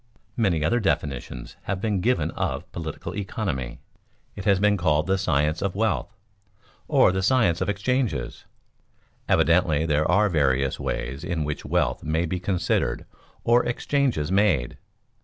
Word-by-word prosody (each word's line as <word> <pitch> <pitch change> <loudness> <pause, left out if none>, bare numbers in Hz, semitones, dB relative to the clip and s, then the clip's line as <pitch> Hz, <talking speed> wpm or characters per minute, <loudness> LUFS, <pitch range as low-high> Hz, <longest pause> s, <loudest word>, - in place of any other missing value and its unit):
Many 95 -9 +1
other 120 +10 +2
definitions 70 - -3
have 95 - -2
been 105 -2 -1
given 125 +5 +1
of - - -3
political 80 -3 -6
economy. 95 - -3 0.6
It 100 - -7
has 100 -3 +4
been 105 +1 +3
called 80 -4 +1
the 95 0 +1
science 75 -2 +1
of 100 -2 -2
wealth, 110 +1 -1 0.7
or - - +5
the 95 0 -1
science 100 -5 +2
of - - 0
exchanges. 105 - -1 0.8
Evidently 80 -3 +3
there 75 -1 +1
are 105 +4 +4
various 70 -6 +1
ways 65 +2 -4
in 85 -3 -2
which 75 0 -4
wealth - - 0
may 80 +2 0
be 90 +2 -3
considered 95 -1 -1 0.4
or 120 +1 +4
exchanges 120 - 0
made. 95 -11 +2
90 Hz, 140 wpm, -25 LUFS, 75-105 Hz, 0.8 s, or